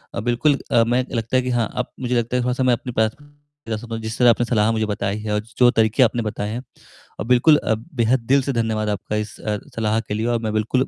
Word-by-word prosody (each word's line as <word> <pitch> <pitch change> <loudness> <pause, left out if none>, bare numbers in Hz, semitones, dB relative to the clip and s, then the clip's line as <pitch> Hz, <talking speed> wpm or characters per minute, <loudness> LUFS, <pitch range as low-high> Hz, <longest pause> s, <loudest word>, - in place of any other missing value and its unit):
अ, - - -2
बिल्कुल 125 +5 +1
अ, 115 - +5
मैं 120 +2 +1
लगता 115 +2 -2
है - - +3
कि 125 - -3
हाँ, 120 -3 0
अब 125 - -3
मुझे 125 -1 -1
लगता 120 +1 0
है 125 - 0
थोड़ा-सा 125 +1 0
मैं 125 -1 +4
अपनी 125 +1 -3
प्राथमिकता 145 +1 -4
समझ 115 0 -4
जिस 110 +1 -5
तरह 125 -1 +6
आपने 120 +1 +3
सलाह 110 -2 +2
मुझे 110 -1 0
बताई 100 0 -2
है 105 -1 -3
और 105 - +1 0.2
जो 125 -1 +6
तरीके 110 +2 +3
आपने 120 0 +1
बताए 105 -1 -3
हैं 125 +2 -5 0.6
और - - -3
बिल्कुल 125 +5 +5
अ, 110 - 0
बेहद 120 0 0
दिल 140 - +5
से 140 - -2
धन्यवाद 110 -2 -1
आपका 105 +1 -3
इस 105 -1 -4
अ, 105 -1 -2 0.2
सलाह 110 0 0
के 105 - -6
लिए 110 +2 -2
और 120 -1 +1
मैं 110 -2 -2
बिल्कुल 115 +5 +1
115 Hz, 255 wpm, -21 LUFS, 110-125 Hz, 0.6 s, तरह